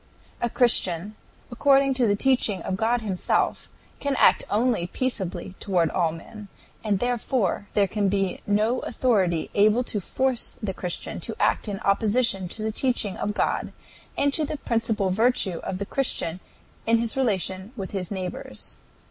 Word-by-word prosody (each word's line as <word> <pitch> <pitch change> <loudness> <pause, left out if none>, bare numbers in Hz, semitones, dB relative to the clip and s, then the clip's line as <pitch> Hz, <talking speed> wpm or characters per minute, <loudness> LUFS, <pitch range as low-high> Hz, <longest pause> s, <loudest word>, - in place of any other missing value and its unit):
"A 240 - +1
Christian, 205 -5 +3 0.4
according 275 +2 +4
to 255 -3 +2
the 205 - +3
teaching 220 -6 +2
of 190 - -2
God 230 +4 +1
himself, 195 -4 -1 0.3
can 280 -1 -1
act - - +5
only 220 -4 +1
peaceably 190 -6 -3
toward 175 -5 +1
all 170 -3 +1
men, 205 +6 -10 0.4
and 210 -3 +1
therefore 240 -3 -1
there 205 - +4
can 200 0 0
be 195 -1 0
no 215 +5 +2
authority 195 -10 0
able 215 +4 +4
to 210 -4 -3
force 260 +5 -1
the 205 -3 -3
Christian 180 -1 -3
to - - -5
act - - +1
in 200 -2 -3
opposition 205 -1 +2
to 215 +5 -5
the 220 - -1
teaching 220 -4 0
of 210 - -3
God - - -1 0.4
and 285 0 +2
to 315 - +1
the 300 +1 -3
principal 225 -6 0
virtue 210 -4 +2
of 185 - -4
the 200 - -3
Christian 195 -8 0 0.5
in 230 0 +5
his 230 0 -1
relation 195 -5 0
with 195 -3 -5
his 185 -3 -3
neighbors." 180 - -5
210 Hz, 160 wpm, -25 LUFS, 190-240 Hz, 0.5 s, act